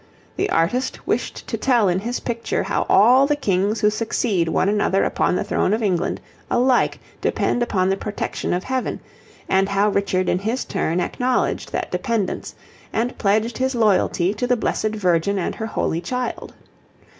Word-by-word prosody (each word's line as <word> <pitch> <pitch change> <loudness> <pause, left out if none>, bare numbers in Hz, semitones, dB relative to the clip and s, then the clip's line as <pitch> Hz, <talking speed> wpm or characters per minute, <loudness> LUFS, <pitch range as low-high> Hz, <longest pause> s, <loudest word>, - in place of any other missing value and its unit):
The - - -1
artist 175 +11 0
wished - - -2
to - - -3
tell 240 -6 +3
in 180 0 +1
his 240 +5 -3
picture 235 -1 -2
how - - -1
all 250 +7 +6
the 295 - +2
Kings 205 -4 0
who 210 -1 +4
succeed 215 -4 0
one 175 - +1
another 205 -1 +2
upon - - +1
the - - 0
throne 200 - +1
of 225 - -3
England 185 -4 0 0.3
alike 250 +1 +2 0.2
depend 245 - 0
upon 190 -6 +1
the - - +2
protection 210 0 -3
of 180 +1 0
Heaven, 260 -1 -2 0.5
and 195 +1 +2
how 200 +1 +2
Richard 195 -2 0
in 180 - +1
his 225 +6 -2
turn 165 +3 -1
acknowledged 250 +8 -1
that - - -3
dependence, 230 -6 -2 0.4
and 240 +3 -1
pledged 220 +3 +1
his 260 0 0
loyalty 200 -4 +2
to 245 - -2
the 250 0 +2
Blessed 215 -1 -1
Virgin 185 0 +1
and 185 - -1
her 220 - -4
Holy 170 -6 -1
Child. 250 +7 -4
210 Hz, 170 wpm, -21 LUFS, 190-240 Hz, 0.5 s, all